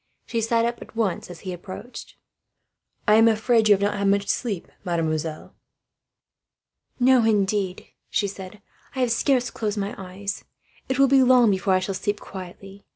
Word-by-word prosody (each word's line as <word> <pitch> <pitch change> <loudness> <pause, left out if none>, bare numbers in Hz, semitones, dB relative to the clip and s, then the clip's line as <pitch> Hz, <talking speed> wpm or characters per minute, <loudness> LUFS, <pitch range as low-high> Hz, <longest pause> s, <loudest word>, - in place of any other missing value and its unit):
She 230 - -2
sat 230 +1 +2
up 235 0 -3
at - - -12
once, 215 -7 -1
as 175 - -10
his 185 - -5
step 175 - -7
approached. 205 +7 -9 0.9
"I 210 +1 +6
am 225 +1 +6
afraid 225 0 +3
you 205 - +8
have 200 - -3
not 205 +1 +1
had 200 - +1
much 200 0 +2
sleep, 210 -8 -2 0.2
mademoiselle." 160 -2 -2 1.5
"No, 255 -1 +5
indeed," 200 -3 0 0.2
she 205 - 0
said. 195 +1 -9 0.3
"I 260 - -1
have 245 -2 +1
scarce 250 +1 +1
closed 215 -1 -3
my 200 0 -2
eyes. 195 +2 -6 0.5
It 265 - 0
will 275 0 +5
be 270 0 +5
long 250 -3 +5
before 190 0 +1
I - - +3
shall 195 +1 -3
sleep 205 +2 -2
quietly. 195 +1 -10
205 Hz, 175 wpm, -24 LUFS, 190-230 Hz, 1.5 s, you